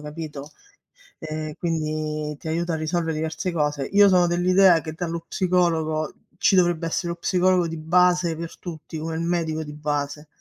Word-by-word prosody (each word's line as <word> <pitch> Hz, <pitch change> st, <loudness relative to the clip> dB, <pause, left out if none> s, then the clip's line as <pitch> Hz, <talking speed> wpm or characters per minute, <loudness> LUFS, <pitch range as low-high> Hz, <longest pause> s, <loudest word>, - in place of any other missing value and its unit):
capito? 150 Hz, -1 st, -7 dB, 0.7 s
E 155 Hz, -1 st, -5 dB
quindi 155 Hz, -2 st, -2 dB
ti -, -, -9 dB
aiuta 170 Hz, +1 st, -1 dB
a -, -, +1 dB
risolvere 160 Hz, +1 st, -1 dB
diverse 160 Hz, +4 st, -2 dB
cose. 150 Hz, -4 st, -1 dB
Io 205 Hz, 0 st, +7 dB
sono 180 Hz, -1 st, +5 dB
dell'idea 175 Hz, 0 st, +4 dB
che 155 Hz, -, -6 dB
dallo 165 Hz, 0 st, -4 dB
psicologo 165 Hz, -4 st, 0 dB, 0.2 s
ci 195 Hz, -, +4 dB
dovrebbe 175 Hz, -2 st, +2 dB
essere 170 Hz, +1 st, -2 dB
lo 170 Hz, -, -2 dB
psicologo 180 Hz, -1 st, +2 dB
di 165 Hz, 0 st, -5 dB
base 175 Hz, +1 st, +3 dB
per 165 Hz, 0 st, -7 dB
tutti, 160 Hz, -2 st, -8 dB
come 160 Hz, +1 st, -4 dB
il 160 Hz, -, -2 dB
medico 165 Hz, -2 st, -1 dB
di 150 Hz, -1 st, -8 dB
base 150 Hz, 0 st, -3 dB
165 Hz, 165 wpm, -24 LUFS, 155-175 Hz, 0.7 s, Io